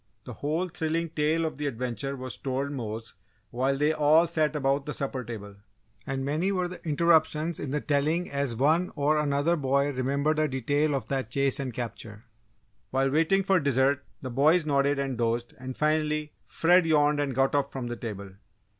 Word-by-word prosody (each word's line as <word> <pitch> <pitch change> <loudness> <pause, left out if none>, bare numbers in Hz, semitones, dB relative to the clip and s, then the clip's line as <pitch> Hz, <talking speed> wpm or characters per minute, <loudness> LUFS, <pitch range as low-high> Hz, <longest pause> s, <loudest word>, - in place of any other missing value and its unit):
The - - -8
whole 160 +5 -2
thrilling 165 0 -2
tale 155 +2 +1
of 155 - -4
the 145 0 -2
adventure 125 +2 -3
was 130 -1 -4
told 135 +1 -3
Mose 115 -4 -5 0.4
while 135 +3 0
they 150 +2 +2
all 155 +2 +4
sat 155 -3 0
about 140 0 0
the 150 - -3
supper 135 -2 -3
table, 105 -4 -8 0.5
and 135 0 -2
many 155 +7 0
were 180 -2 0
the 180 0 -10
interruptions 160 0 +2
in 145 - -4
the 150 +2 -1
telling 155 +5 0
as 140 -4 -2
one 155 +8 +2
or 150 +1 +2
another 145 +3 +1
boy 140 -1 +1
remembered 140 +4 0
a 155 - +2
detail 145 +3 0
of 125 -5 -3
that 135 -5 -2
chase 135 +2 +1
and 135 -2 -3
capture. 110 -2 -6 0.7
While 135 +1 +1
waiting 165 +6 +3
for 190 -1 +3
dessert, 140 -1 +2 0.2
the 130 - -4
boys 155 +6 +3
nodded 140 -1 +2
and 135 -3 -2
dozed, 115 +1 -1
and 130 0 -7
finally, 150 0 0
Fred 175 +1 +3
yawned 150 -1 +3
and 140 -3 -1
got 135 +1 +2
up 140 -1 +1
from 130 -2 -5
the 120 0 -4
table. 100 -5 -7
140 Hz, 185 wpm, -27 LUFS, 130-155 Hz, 0.7 s, all